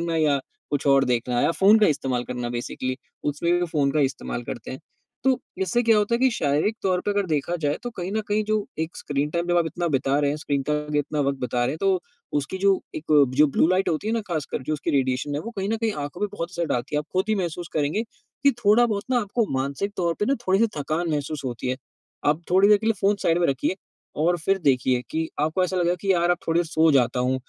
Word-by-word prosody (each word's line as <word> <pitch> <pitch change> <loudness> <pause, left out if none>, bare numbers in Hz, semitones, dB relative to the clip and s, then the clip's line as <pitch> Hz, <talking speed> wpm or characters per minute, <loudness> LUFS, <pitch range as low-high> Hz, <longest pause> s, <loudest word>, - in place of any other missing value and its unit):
करना 170 -1 -1
या 150 -3 +3 0.3
कुछ 145 0 -1
और 135 -1 +5
देखना 120 0 0
या - - +3
फ़ोन 205 +3 +7
का 215 - +5
इस्तेमाल 135 -5 0
करना 125 -1 -4
बेसिकली 130 +2 -3 0.3
उसमें 150 +4 0
भी 175 - +2
वो 175 - 0
फ़ोन 145 -4 +1
का 155 - +2
इस्तेमाल 135 -3 -2
करते 120 -1 -6
हैं। 130 - -7 0.4
तो 260 -1 +3 0.2
इससे 190 +6 +1
क्या 225 -2 +4
होता 210 +3 +1
है 235 - +2
कि 260 0 +4
शारीरिक 155 +4 +1
तौर 185 -2 +1
पे 205 - 0
अगर 205 -1 0
देखा 155 +1 -1
जाए 145 -1 0
तो 245 - -4
कहीं 185 -4 -5
न 220 - 0
कहीं 210 +1 +1
जो 215 0 +1 0.2
एक 160 +1 -3
स्क्रीन 145 +1 -2
टाइम 170 +1 -1
जब 175 - +2
आप 170 - +1
इतना 175 +1 -2
बिता 135 +1 +2
रहे 145 -1 +2
हैं, 150 - -2
स्क्रीन 145 -2 -1
के 150 - -2
आगे 150 0 -1
इतना 145 +1 -1
वक़्त 140 -1 0
बिता 125 0 -1
रहे 120 - +2
हैं 155 - -5
तो 195 -2 +2 0.4
उसकी 150 +7 -4
जो 195 -1 +4
एक 155 - -5 0.3
जो 150 - +6
ब्लू 145 - +2
लाइट 185 +1 +2
होती 170 +5 -1
है 220 - 0
ना 230 - 0
ख़ास 160 -4 -1
कर - - -2
जो 155 - -3
उसकी 150 - -2
रेडिएशन 135 +1 0
है, 145 - -1
वो 225 - -6
कहीं 195 +1 -2
न 225 - +1
कहीं 225 -1 -1
आँखों 145 +6 -8
पे 210 - +2
बहुत 170 +1 -3
असर 170 -2 -2
डालती 125 +2 -2
है। 150 - +3
आप 150 - -4
खुद 185 +1 +1
ही 215 - +3
महसूस 175 -3 -3
करेंगे 155 +8 0
कि 245 +4 -2
थोड़ा-बहुत 210 0 +4
ना 245 - +3
आपको 215 +2 -1
मानसिक 140 +10 -2
तौर 170 -2 0
पे 210 - +3
ना 275 - +3
थोड़ी 190 +1 +3
सी 230 - +4
थकान 155 +4 -1
महसूस 145 0 -2
होती 125 0 -4
है। 130 - -1 0.5
आप 150 +3 +2
थोड़ी 190 +3 +5
देर 210 - +7
के 220 - -5
लिए 225 - +4
फ़ोन 200 +1 +3
साइड 165 +1 +2
में 175 - +3
रखिए 140 +7 0 0.4
और 170 +4 +2
फ़िर 195 +5 +1
देखिए 130 -2 +2
कि 160 0 -1
आपको 160 +5 +1
ऐसा 185 +1 -2
लगेगा 175 0 +2
कि 195 -1 +2
यार 175 0 +2
अब 175 - +3
थोड़ी 165 +1 +2
देर 175 - +2
सो 160 0 +3
जाता 125 -2 +2
हूँ 125 +1 +1
160 Hz, 265 wpm, -24 LUFS, 140-195 Hz, 0.5 s, फ़ोन